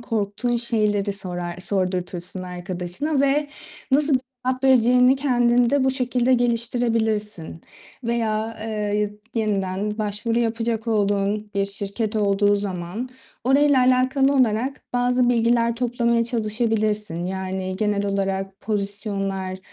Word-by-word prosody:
korktuğun 230 +1 -1
şeyleri 210 -4 0
sorar 175 -3 -4
sordurtursun 185 -1 -2
arkadaşına 180 - -3
ve 285 +1 +2 0.4
nasıl 285 +1 +3
bir 255 - +3 0.3
cevap 255 +1 -1
vereceğini 250 0 +5
kendinde 245 0 +2
bu 265 - +3
şekilde 250 -1 +1
geliştirebilirsin. 230 -7 -1 0.4
Veya, 225 -1 -1
eee, - - -4 0.3
y 210 -1 0 0.3
yeniden 205 +1 -2
başvuru 215 +3 -1
yapacak 230 -1 -1
olduğun 205 -1 0
bir 200 0 +1
şirket 200 +2 -3
olduğu 205 0 +3
zaman 195 +4 -4 0.4
orayla 280 +2 +4
alakalı 260 +2 +3
olarak 255 +1 +1
bazı 245 0 +2
bilgiler 235 -1 +2
toplamaya 235 -1 +1
çalışabilirsin. 215 -5 -1
Yani, 190 0 -3
genel 205 -1 0
olarak 195 0 -2
pozisyonlar 195 -2 -2
220 Hz, 110 wpm, -23 LUFS, 195-245 Hz, 0.4 s, vereceğini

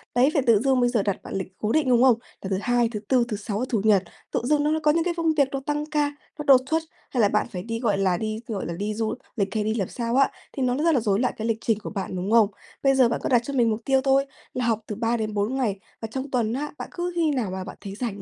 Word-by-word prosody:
Đấy, 250 +3 +5
phải 285 - +3
tự 225 -3 +6
dưng 265 +2 +2
bây 245 0 +3
giờ 230 -5 +1
đặt 200 -2 0
bạn - - -8
lịch 190 -1 -2
cố 215 - -1
định, 305 -2 +2
đúng 245 0 +5
không? 255 -3 +6 0.3
Là 190 - -5
thứ 190 - 0
Hai, 240 0 +2
thứ 215 -3 -4
Tư, 250 -1 +4
thứ 210 -4 -3
Sáu, 205 +2 -3
Chủ 220 -5 +1
Nhật, 205 -3 +4 0.3
tự - - 0
dưng 295 +3 +2
nó 310 +1 +1
có 300 - +5
những 330 +2 +1
cái 350 0 0
công 330 -1 +2
việc 285 -3 +3
nó 275 - -2
tăng 295 0 -1
ca, 295 -1 0 0.3
nó 295 - -2
đột 265 -2 +8
xuất 320 0 +1 0.3
hay 250 - +1
là 205 - +4
bạn 210 - +1
phải 180 -4 -5
đi, 230 +1 -4
gọi 215 -5 +1
là, 185 -3 +2
đi, 215 +1 -3
gọi 210 -4 -3
là, 170 - -4
đi 205 +4 -3
du 220 0 -1 0.2
lịch 200 -1 -1
hay 215 - +1
đi 220 +1 0
làm 195 -5 -1
sao 235 -1 -3
á, 275 0 +5 0.2
thì 270 - -2
nó 250 -1 +1
rất 330 +3 +3
là 260 - +3
rối 205 -3 +1
loạn 250 - +1
cái 220 - -3
lịch 225 -1 +1
trình 225 -3 +1
của 210 - -6
bạn, 195 -2 -4
đúng 185 +4 -3
không? 230 -3 +6 0.4
Bây 270 -1 +4
giờ 255 -3 +5
bạn 235 - -1
có - - -1
đặt 245 -3 +4
cho 280 - -4
mình 240 -4 +3
mục 220 +1 -1
tiêu 270 -1 +3
thôi 275 0 +3 0.3
là 250 -1 -1
học 225 -2 +1
từ 210 - -4
3 230 +2 0
đến 215 -1 -3
4 210 +5 0
ngày 215 -7 -1 0.2
và 225 - -3
trong 265 +2 -4
tuần 235 -3 +1
á, 290 +3 -3
bạn - - -6
cứ 350 0 -3
khi 325 -3 +2
nào 240 -9 -1
mà 190 0 -4
bạn - - -9
thấy 195 -1 -7
rảnh 215 -3 -4
235 Hz, 315 wpm, -25 LUFS, 210-270 Hz, 0.4 s, đột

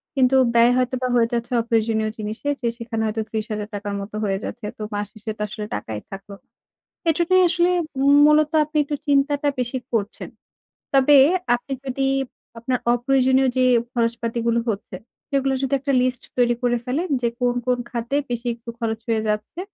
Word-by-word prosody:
কিন্তু 265 -1 +3 0.2
ব্যয় 235 +1 +6
হয়তোবা 255 0 0
হয়ে 235 -1 +4
যাচ্ছে 235 0 -2
অপ্রয়োজনীয় 225 -1 0
জিনিসে, 215 +6 -4
যে 240 - 0
সেখানে 230 -1 -4
হয়তো 220 +1 -2
৩০,০০০ 215 -1 -3
টাকার 205 0 -4
মত 200 - -8
হয়ে 195 -2 0
যাচ্ছে। 235 -1 -6
তো - - -10
মাস 205 0 -2
শেষে 215 0 -6
তো - - -8
আসলে 210 +1 -6
টাকাই 105 +1 -5
থাকলো। 195 +1 -9 0.8
এজন্যই 345 +3 +3
আসলে, 345 +1 +2 0.6
মূলত 300 0 +4
আপনি 305 +1 -8
একটু 290 +1 -3
চিন্তাটা 285 +1 +2
বেশি 250 +1 -1
করছেন। 215 -2 -2 0.7
তবে 275 +2 +6 0.4
আপনি 245 +3 -5
যদি 270 0 -1 0.5
আপনার 250 +2 -1
অপ্রয়োজনীয় 260 +1 +3
যে 255 - +3 0.3
খরচপাতিগুলো 235 -1 0
হচ্ছে, 200 -2 -5 0.3
সেগুলোর 270 -1 +1
যদি 270 +1 0
একটা 275 +1 -1
লিস্ট 255 -1 -1 0.2
তৈরি 240 -1 +4
করে 240 -1 +2
ফেলেন 295 +9 -2
যে 235 - +2
কোন, 245 -1 +2
কোন 250 -1 +2
খাতে 240 +3 -2
বেশি 240 0 -3
একটু 235 0 -9
খরচ 225 -1 -2
হয়ে 225 -1 +1
যাচ্ছে। 210 +10 -3
240 Hz, 165 wpm, -22 LUFS, 220-270 Hz, 0.8 s, ব্যয়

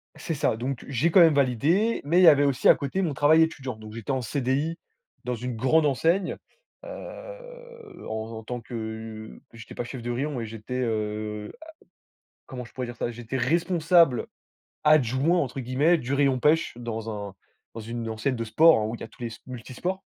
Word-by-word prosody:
C'est 165 - -4
ça, 135 -6 0
donc 130 +2 -4
j'ai 140 +5 +1
quand 185 - +6
même 165 -3 +7
validé, 150 - +2
mais 165 +5 +2
il - - +6
y - - +8
avait 145 -3 +7
aussi 140 -3 +2
à - - +8
côté 150 +5 -2
mon 165 -6 -1
travail 150 +3 +5
étudiant. 135 -6 -3
Donc 110 0 -11
j'étais 115 0 -5
en 130 -1 0
CDI 140 +6 -1 0.5
dans 125 0 -1
une 125 +1 -5
grande 150 +7 +3
enseigne, 165 +7 +1 0.5
heu, - - -10
en 110 +1 -4
en 110 - -8
tant 120 +2 -5
que 110 -2 -7
j'étais 115 -1 -11
pas - - -3
chef 125 +1 -7
de 120 - -5
rayon 140 +4 -2
mais 115 - -3
j'étais, 115 +3 -6
heu, 105 -2 -3
a 320 - -11 0.8
comment 125 -2 -7
je 120 - -15
pourrais 130 -1 -4
dire 120 0 -8
ça? 120 - -2
J'étais 120 +2 -6
«responsable 165 -1 +3 0.6
adjoint» 150 +3 +3
entre 135 -3 -3
guillemets 135 +7 +2
du 130 -2 -4
rayon 140 -2 +2
pêche, 155 +4 +2
dans 115 -2 -5 0.2
un 95 - -16 0.4
dans 115 - -7
une 115 +1 -5
enseigne 110 +4 -1
de 115 - -3
sport, 160 +6 +5
hein, 105 - -1
où 110 - -4
il - - -14
y - - -4
a - - -6
tous - - -19
les 120 - -2
s 115 -1 -10
multisports. 130 - -5
130 Hz, 200 wpm, -26 LUFS, 115-160 Hz, 0.8 s, y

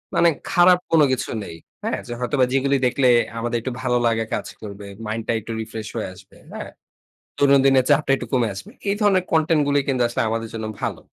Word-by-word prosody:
মানে 170 - +5 0.2
খারাপ 180 0 +6
কোন 165 -1 +5
কিছু 130 - -1
নেই। 80 - -8 0.3
হ্যাঁ, - - -1 0.2
হয়তোবা 130 +1 +2
যেগুলো 140 +1 +2
দেখলে, 130 +1 +2 0.3
আমাদের 120 +1 -1
একটু 130 +3 -4
ভালো 125 -1 +1
লাগে 115 -1 +2
কাজ - - -2
করবে। 100 -1 -8 0.2
মাইন্ড 110 +1 -3
টা - - +1
একটু 115 +2 -8
রিফ্রেশ 110 -1 -6
হয়ে 110 - -3
আসবে। - - -17 0.2
হ্যাঁ। - - -7 0.7
দৈনন্দিনের 135 -2 +4
চাপটা 145 -1 +3
একটু 125 - -7
কমে 125 -3 +3
আসবে। 95 - -9 0.2
এই 200 - +1
ধরনের 195 -3 +3
কনটেন্ট 160 -1 +3
গুলো 145 - +2
কিন্তু 130 -3 0
আসলে, 120 - -1
আমাদের 115 0 -3
জন্য 110 -1 -4 0.2
ভালো। - - -2
130 Hz, 195 wpm, -22 LUFS, 115-145 Hz, 0.7 s, খারাপ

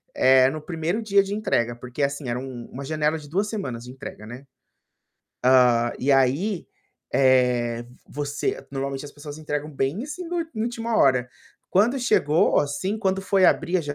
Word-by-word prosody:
eh, 130 0 +5
no 155 - -5
1º 165 +5 -2
dia 200 -2 +4
de 200 - -5
entrega 120 - 0
porque, 125 +3 -7
assim, 140 -1 -2
era 120 +1 -2
uma 125 -3 -7
uma 135 +2 -7
janela 155 +1 0
de 145 - -13
2 195 +7 0
semanas 130 - -4
de 125 - -9
entrega, 130 -5 -9
né. 125 +4 -10 1.0
Hã. 125 -2 +5
E 140 +3 +1
aí, 140 +9 +1 0.5
eh, 125 -3 +3 0.2
você 145 +1 -3
normalmente 135 0 -3
as 145 - -10
pessoas 145 0 -9
entregam 150 0 -4
bem 140 - -2
assim, 350 +5 -6
no 350 0 -3
na 330 - -2 0.2
última 235 -1 -2
hora, 125 -2 +3 0.4
quando 220 +8 +3
chegou, 165 -9 +3
assim, 150 +8 -2
quando 195 -2 0
foi 195 0 +2
abrir 180 +2 +2
a 175 - 0
145 Hz, 170 wpm, -24 LUFS, 130-190 Hz, 1.0 s, eh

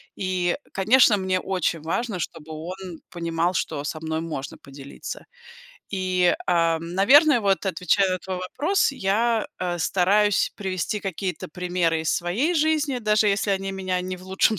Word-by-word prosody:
И, 185 -2 0 0.2
конечно, 215 +3 +5
мне 190 -1 0
очень 175 -4 -1
важно, 190 +5 -2
чтобы 160 -1 -6
он 175 +2 -7
понимал, 170 0 -1
что 145 -4 -2
со 155 +1 -4
мной 160 0 -3
можно 150 -5 -5
поделиться. 140 0 -9 0.7
И, 185 -2 +2
ам, 165 -1 +1
наверное, 275 - +6
вот, 200 -2 +1
отвечая 180 -1 +1
на 185 - -1
твой 185 +1 -5
вопрос, 290 - 0
я, 225 +1 +1
э, 175 -1 -2
стараюсь 195 +4 +2
привести 190 +1 -2
какие-то 190 -2 -4
примеры 175 -1 -1
из 160 - +1
своей 215 - 0
жизни, 305 -4 +1
даже 215 -2 +2
если 205 +1 +1
они 195 0 -1
меня 185 -1 -2
не 185 0 -4
в 180 - -14
лучшем 190 +3 +2
185 Hz, 150 wpm, -24 LUFS, 170-205 Hz, 0.7 s, наверное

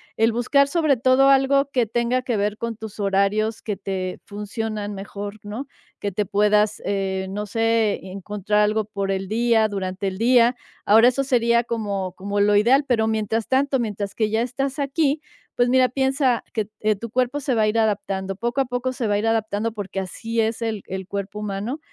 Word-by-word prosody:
el 225 +1 +3
buscar, 275 +4 +2
sobre 310 -5 +2
todo, 255 +3 +4
algo 275 +1 +4
que 245 -3 +2
tenga 240 +3 0
que 245 -4 -2
ver 205 +1 -1
con 230 -2 -4
tus 220 -2 -9
horarios 200 +3 +1
que 210 - -3
te 190 -1 -4
funcionan 210 0 -4
mejor, 200 +1 -7
¿no?, 215 +7 -5 0.3
que 200 -2 -3
te 210 +2 0
puedas, 210 +1 +2
eh, 190 -1 -1
no 210 +2 -4
sé, 225 0 +1
encontrar 205 +2 -1
algo 210 0 +1
por 200 -2 -3
el 190 0 -2
día, 225 +1 +2
durante 195 -1 -3
el 190 0 -3
día. 240 +1 +4 0.3
Ahora 225 +4 +7
eso 275 +2 -1
sería 235 -2 +2
como 200 -6 -3
como 200 +2 -3
lo 205 0 +4
ideal, 260 +7 +4
pero 220 -3 +2
mientras 220 0 -1
tanto, 270 0 +2
mientras 205 -3 -3
que 215 -2 +1
ya 220 +1 +1
estás 270 +3 -2
aquí, 285 +1 +1 0.4
pues, 245 0 +3
mira, 255 0 +4
piensa 265 -1 +1
que, 215 -3 -2
eh, 215 0 +2
tu 230 +3 -7
cuerpo 255 +4 0
se 270 -1 -1
va 220 -2 +2
a 215 - +3
ir 215 - 0
adaptando, 200 -3 -1
poco 240 +4 0
a - - 0
poco 250 +1 -2
se 245 -4 -2
va 205 - +1
a - - +2
ir 225 - -1
adaptando, 220 0 0
porque 195 -2 -5
así 225 +5 -4
es 225 +1 0
el 220 -3 -2
el 190 0 -5
cuerpo 200 +1 -5
humano, 210 +7 -4
220 Hz, 200 wpm, -23 LUFS, 205-245 Hz, 0.4 s, Ahora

